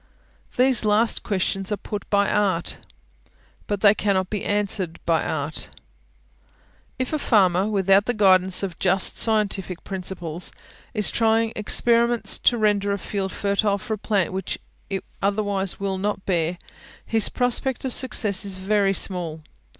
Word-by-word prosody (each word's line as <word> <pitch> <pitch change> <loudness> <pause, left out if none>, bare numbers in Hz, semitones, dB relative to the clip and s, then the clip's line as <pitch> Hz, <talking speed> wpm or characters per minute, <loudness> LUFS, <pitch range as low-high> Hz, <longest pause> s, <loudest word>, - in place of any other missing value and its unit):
These 255 -2 +3
last 215 +2 +2
questions 195 0 -1
are 210 - 0
put 205 +1 -7
by 200 0 +2
Art, 190 -5 0 0.9
but 205 -1 -2
they 205 -1 +7
cannot 195 -3 0
be 210 -3 -3
answered 200 -4 -1
by 165 -2 +2
Art. 150 0 -4 1.3
If 255 +3 -3
a 305 - 0
farmer, 190 -6 +3
without 195 -1 +3
the 245 - 0
guidance 190 -2 +4
of 185 -4 -5
just 190 0 +2
scientific 200 -5 -1
principles, 180 -3 -4 0.4
is 210 -2 +2
trying 225 0 +1
experiments 235 +2 +2
to 240 - +3
render 205 -2 +1
a 200 - 0
field 195 -1 -3
fertile 200 +1 0
for 215 +2 -5
a - - -3
plant 195 -5 0
which 190 -1 -3 0.3
it 195 -1 -3 0.2
otherwise 200 -1 -1
will 195 -1 -2
not 205 0 -3
bear, 175 -2 0 0.5
his 225 -1 +3
prospect 250 +1 0
of 260 - -1
success 215 -7 0
is 200 -2 -2
very 195 +1 +1
small. 170 -5 -1
200 Hz, 145 wpm, -23 LUFS, 190-215 Hz, 1.3 s, they